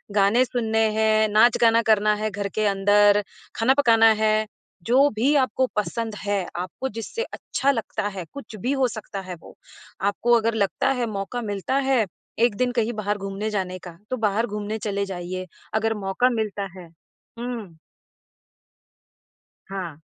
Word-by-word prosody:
गाने 205 +5 +4
सुनने 225 -3 -1
हैं, 220 0 +3
नाच-गाना 230 +1 +5
करना 215 -1 +3
है 215 +1 -2
घर 200 0 -3
के 215 - +1
अंदर 205 +1 +4 0.3
खाना 240 +4 +4
पकाना 225 -4 +5 0.2
है, 215 0 +3 0.4
जो 270 +6 +4
भी 260 +7 +2
आपको 260 -1 +2
पसंद 220 +1 -2
है 205 0 -1 0.2
आपको 185 +9 -4
जिससे 230 - -4
अच्छा 280 - -1
लगता 225 -4 -3
है 190 -4 -6
कुछ 280 -6 -9
भी 250 +4 0
हो 265 -2 +2
सकता 215 -3 -6
है 185 -1 -7
वो। - - -15 0.4
आपको 205 +4 +1
अगर 230 0 0
लगता 215 +6 +1
है 240 - +1
मौका 200 +5 -4
मिलता 205 +3 -2
है 245 -5 +3 0.3
1 230 -3 +3
दिन 250 +1 +1
कहीं 235 0 0
बाहर 210 -1 -2
घूमने 195 +2 -4
जाने 185 -3 -3
का 170 -1 -11
तो 255 - 0
बाहर 220 +1 +1
घूमने 210 +1 -4
चले 200 -1 -2
जाइए 185 0 -5 0.3
अगर 220 +1 +1
मौका 245 +7 +2
मिलता 210 -3 -2
है। 175 - -11 0.5
हुँ। 235 -8 -5 1.9
हाँ। 180 -6 -5
215 Hz, 160 wpm, -24 LUFS, 200-235 Hz, 1.9 s, नाच-गाना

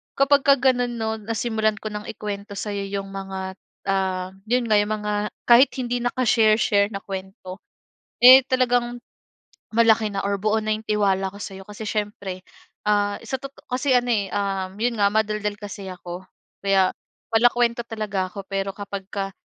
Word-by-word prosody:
kapag 280 +1 +4
ka 280 - +8
gano'n, 245 -2 +1
'no 220 0 -2
nasimulan 220 0 -1
ko 215 0 -6
ng 210 0 -6
ikwento 205 -1 -6
sa'yo 200 0 -3
'yong 195 -1 -4
mga 190 -1 -6 0.3
ah 185 -1 -1 0.2
'yon 245 +1 +1
nga 210 - +6
'yong 205 +1 0
mga 210 0 -3 0.3
kahit 245 +3 +7
hindi 245 -1 -1
naka-share 235 -3 +3
share 200 -2 +3
na 195 -2 -7
kwento, 190 -1 -7 0.6
eh 255 +1 +11
talagang 245 -1 +1 0.8
malaki 225 -2 +4
na 195 - 0
or 200 0 0
buo 215 +1 +2
na 215 0 +1
'yong 220 - -17
tiwala 195 -2 +1
ko - - -10
sa'yo. 195 0 -8
Kasi 210 +1 -8
siyempre, 205 -3 -3 0.5
ah, 205 -1 +2
sa 265 - -3
toto 275 0 -10
kasi 260 +2 -1
ano 245 0 +2
eh, 205 -4 +1
um, 195 -1 -2
'yon 240 +1 0
nga 200 0 +4
madaldal 210 -1 0
kasi 200 -1 -7
ako. 180 0 -8 0.4
Kaya 195 -2 +3 0.4
palakuwento 235 +1 +3
talaga 205 -4 -2
ako. 200 -1 -8
Pero 195 0 -2
kapagka 200 -1 -5
210 Hz, 165 wpm, -23 LUFS, 195-235 Hz, 0.8 s, eh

